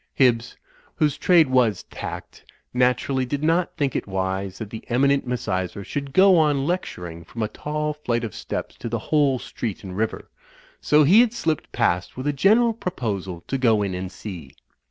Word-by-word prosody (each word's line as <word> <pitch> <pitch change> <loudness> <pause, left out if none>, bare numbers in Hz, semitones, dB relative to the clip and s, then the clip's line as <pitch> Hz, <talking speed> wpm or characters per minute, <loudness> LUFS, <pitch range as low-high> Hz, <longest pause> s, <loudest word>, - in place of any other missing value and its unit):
Hibbs, 120 -3 +2 0.4
whose 150 -2 +1
trade 170 -4 +4
was 120 -6 +2
tact, - - -7 0.3
naturally 125 +1 +1
did 140 +3 -3
not 165 +3 +1
think 140 -3 0
it - - -2
wise 95 0 -2
that 110 -3 -7
the 110 - -7
eminent 140 +2 +2
Misysra 100 -5 -2
should 140 +5 -4
go 190 +2 +6
on 145 -3 +2
lecturing 90 - -4
from 110 +7 -5
a - - 0
tall 150 +5 -3
flight 120 -5 -2
of 110 - -4
steps - - -5
to 115 - -5
the 115 - -1
whole 140 +2 +2
street 115 -4 -5
and 95 -2 -7
river, 110 +2 -3 0.5
so 150 0 +5
he 190 +11 +7
had 240 -2 +2
slipped 160 -10 -2
past 90 +4 0
with 130 - -5
a 145 - +1
general 220 - +4
pro 200 -4 -4
posal 95 - -4
to 135 - -2
go 110 -5 +3
in 95 -2 -2
and 90 0 -4
see. 90 -10 -9
125 Hz, 185 wpm, -23 LUFS, 100-150 Hz, 0.5 s, he